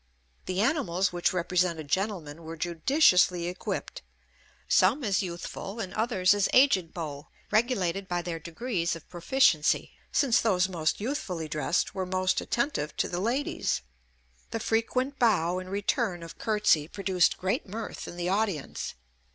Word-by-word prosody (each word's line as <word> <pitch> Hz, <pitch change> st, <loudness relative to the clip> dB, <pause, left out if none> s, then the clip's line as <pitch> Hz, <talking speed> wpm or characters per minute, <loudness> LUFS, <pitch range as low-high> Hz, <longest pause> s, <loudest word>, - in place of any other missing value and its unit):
The 185 Hz, +1 st, 0 dB
animals 195 Hz, -, +1 dB
which 175 Hz, 0 st, +1 dB
represented 175 Hz, -3 st, 0 dB
gentlemen 170 Hz, -3 st, -2 dB
were 165 Hz, 0 st, -8 dB
judiciously 180 Hz, -, +3 dB
equipped; 180 Hz, -, -4 dB, 0.7 s
some 230 Hz, +10 st, +4 dB
as 200 Hz, -4 st, +1 dB
youthful 185 Hz, +3 st, -6 dB
and 190 Hz, -5 st, -4 dB
others 205 Hz, -5 st, +3 dB
as 205 Hz, -1 st, +1 dB
aged 195 Hz, -, +4 dB
beaux, 150 Hz, -4 st, -6 dB, 0.2 s
regulated 200 Hz, -5 st, +1 dB
by 175 Hz, -1 st, -2 dB
their 165 Hz, -1 st, -4 dB
degrees 170 Hz, +1 st, -2 dB
of 165 Hz, -, -12 dB
proficiency, 175 Hz, -, +2 dB, 0.2 s
since 260 Hz, -5 st, +3 dB
those 185 Hz, -5 st, +2 dB
most 165 Hz, -4 st, -1 dB
youthfully 205 Hz, -, -3 dB
dressed 155 Hz, +3 st, 0 dB
were 190 Hz, -1 st, -3 dB
most 185 Hz, 0 st, +1 dB
attentive 240 Hz, -, -2 dB
to -, -, +1 dB
the 175 Hz, -, -3 dB
ladies. 250 Hz, +7 st, -1 dB, 0.7 s
The 225 Hz, -, -3 dB
frequent 255 Hz, +5 st, 0 dB
bow 185 Hz, -7 st, +3 dB
and 185 Hz, 0 st, -8 dB
return 200 Hz, -2 st, -1 dB
of 165 Hz, -, -10 dB
curtsey 210 Hz, -9 st, +2 dB
produced 190 Hz, -1 st, +1 dB
great 200 Hz, -, -1 dB
mirth 220 Hz, +3 st, -6 dB
in 175 Hz, -, -8 dB
the 175 Hz, 0 st, -2 dB
audience. 195 Hz, -6 st, -2 dB
185 Hz, 145 wpm, -28 LUFS, 170-220 Hz, 0.7 s, some